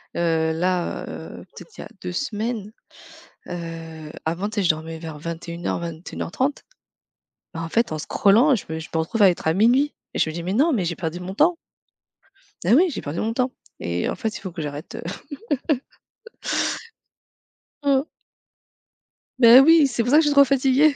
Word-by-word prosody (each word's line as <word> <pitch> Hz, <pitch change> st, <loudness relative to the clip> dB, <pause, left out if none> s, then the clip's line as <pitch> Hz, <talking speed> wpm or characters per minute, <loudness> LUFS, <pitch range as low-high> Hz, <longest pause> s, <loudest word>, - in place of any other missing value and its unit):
heu, 160 Hz, -1 st, +1 dB
là, 180 Hz, +1 st, -1 dB
heu, -, -, -8 dB
peut-être 465 Hz, -, -13 dB
il -, -, -7 dB
y -, -, -6 dB
a -, -, -9 dB
2 180 Hz, -, -4 dB
semaines, 220 Hz, -2 st, -3 dB, 0.8 s
heu, 165 Hz, -3 st, -7 dB
avant 170 Hz, +6 st, -1 dB
tu 215 Hz, -, -9 dB
sais, 205 Hz, -, +2 dB
je 175 Hz, -, +3 dB
dormais 160 Hz, +1 st, -2 dB
vers 160 Hz, -2 st, -7 dB
21:00-21:30. 170 Hz, -, -4 dB, 0.9 s
Bah 165 Hz, -, -4 dB
en 165 Hz, -, -4 dB
fait, 230 Hz, +6 st, +1 dB
en 155 Hz, -, -2 dB
scrollant, 225 Hz, -, +4 dB
je 220 Hz, -, -3 dB
me 160 Hz, -, -3 dB
je 160 Hz, -, -8 dB
me 160 Hz, -, 0 dB
retrouve 205 Hz, +7 st, 0 dB
à 190 Hz, -, +8 dB
être 175 Hz, -, -5 dB
à 160 Hz, -, +3 dB
00:00 250 Hz, +8 st, +3 dB, 0.2 s
et -, -, -2 dB
je 160 Hz, -, +2 dB
me -, -, -8 dB
dis: 170 Hz, -, -4 dB
«Mais 185 Hz, +3 st, -2 dB
non, 300 Hz, +7 st, +3 dB
mais 205 Hz, -8 st, +1 dB
j'ai 170 Hz, -1 st, -2 dB
perdu 170 Hz, +1 st, -4 dB
mon 185 Hz, +2 st, -6 dB
temps!» 330 Hz, -, +3 dB, 1.1 s
Ah 200 Hz, -, +4 dB
oui, 355 Hz, +6 st, +5 dB
j'ai -, -, -5 dB
perdu 145 Hz, +4 st, -4 dB
mon 225 Hz, +1 st, -1 dB
temps! 255 Hz, +1 st, 0 dB, 0.3 s
Et 85 Hz, 0 st, -2 dB
en -, -, -1 dB
fait 220 Hz, -1 st, -3 dB
il -, -, -10 dB
faut 190 Hz, -, -7 dB
que 165 Hz, -2 st, -6 dB
j'arrête 145 Hz, +2 st, -6 dB, 0.8 s
heu 265 Hz, -3 st, +1 dB, 2.0 s
Mmh. 275 Hz, -1 st, +3 dB, 1.4 s
Beh 235 Hz, 0 st, +9 dB
oui, 310 Hz, +1 st, +7 dB
c'est 245 Hz, -2 st, -1 dB
pour 245 Hz, -, -1 dB
ça 300 Hz, -, +7 dB
que -, -, +7 dB
je -, -, +1 dB
suis 290 Hz, -, +3 dB
trop 280 Hz, -, +9 dB
fatiguée. 275 Hz, +2 st, +3 dB
190 Hz, 190 wpm, -23 LUFS, 165-255 Hz, 2.0 s, Beh